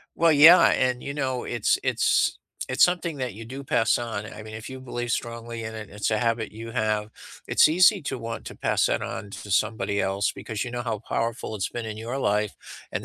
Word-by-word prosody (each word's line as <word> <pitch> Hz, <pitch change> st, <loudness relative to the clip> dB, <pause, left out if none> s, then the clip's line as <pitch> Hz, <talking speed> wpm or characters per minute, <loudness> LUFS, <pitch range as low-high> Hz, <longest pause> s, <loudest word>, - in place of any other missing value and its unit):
Well, 165 Hz, -1 st, +4 dB
yeah, 160 Hz, +5 st, +9 dB
and, 125 Hz, -1 st, +1 dB
you 140 Hz, -, -5 dB
know, 130 Hz, -3 st, -2 dB
it's 120 Hz, -3 st, +1 dB
it's -, -, +2 dB, 0.3 s
it's 130 Hz, -, +5 dB
something 175 Hz, -3 st, -1 dB
that 125 Hz, -6 st, -4 dB
you 115 Hz, -, -9 dB
do 135 Hz, +4 st, -8 dB
pass 115 Hz, -3 st, +2 dB
on, 110 Hz, -3 st, -4 dB
I -, -, -9 dB
mean, 110 Hz, 0 st, -9 dB
if 110 Hz, +2 st, -7 dB
you 130 Hz, -, -7 dB
believe 120 Hz, -2 st, -4 dB
strongly 115 Hz, -1 st, -4 dB
in 110 Hz, -, -6 dB
it, 110 Hz, -2 st, -7 dB
it's 105 Hz, +1 st, -2 dB
a 110 Hz, -, +2 dB
habit 115 Hz, -2 st, -1 dB
you 115 Hz, +2 st, -8 dB
have, 110 Hz, -1 st, -1 dB, 0.4 s
it's -, -, +6 dB
easy 185 Hz, +5 st, +5 dB
to 140 Hz, -2 st, -3 dB
want 115 Hz, -1 st, -6 dB
to -, -, -8 dB
pass -, -, +1 dB
that -, -, 0 dB
on 100 Hz, -, -5 dB
to 100 Hz, -, -9 dB
somebody 105 Hz, 0 st, 0 dB
else 95 Hz, +1 st, 0 dB
because 110 Hz, -3 st, -5 dB
you 125 Hz, -, -6 dB
know 120 Hz, 0 st, -3 dB
how 110 Hz, -4 st, -3 dB
powerful 115 Hz, -1 st, -3 dB
it's 95 Hz, -, -2 dB
been 120 Hz, -1 st, -5 dB
in 110 Hz, -1 st, -5 dB
your 115 Hz, +4 st, -5 dB
life, 105 Hz, -3 st, 0 dB, 0.4 s
and -, -, -3 dB
115 Hz, 225 wpm, -25 LUFS, 110-130 Hz, 0.4 s, yeah